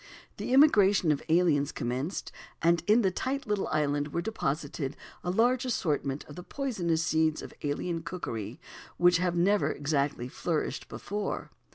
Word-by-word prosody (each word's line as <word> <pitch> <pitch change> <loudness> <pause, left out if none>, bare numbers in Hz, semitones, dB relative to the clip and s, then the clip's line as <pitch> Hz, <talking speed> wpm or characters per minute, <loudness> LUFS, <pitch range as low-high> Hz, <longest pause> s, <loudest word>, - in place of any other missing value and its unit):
The - - -4
immigration 205 - +5
of 145 - 0
aliens 160 -4 +3
commenced, 130 +9 -3 0.3
and 170 0 +3
in 220 +3 +5
the 190 - +3
tight 270 +8 -2
little 210 -2 -1
island 145 -1 0
were 170 +3 -2
deposited 145 -7 -3 0.3
a 180 - -2
large 240 +7 +3
assortment 150 - -1
of 145 - -12
the 180 - -7
poisonous 175 - -1
seeds 160 -1 +1
of - - -9
alien 165 +4 -2
cookery 115 - -5 0.4
which 175 0 +5
had 180 0 0
never 195 +4 +3
exactly 140 -4 -1
flourished 160 +4 -3
before. 205 0 -4
170 Hz, 150 wpm, -29 LUFS, 145-200 Hz, 0.4 s, immigration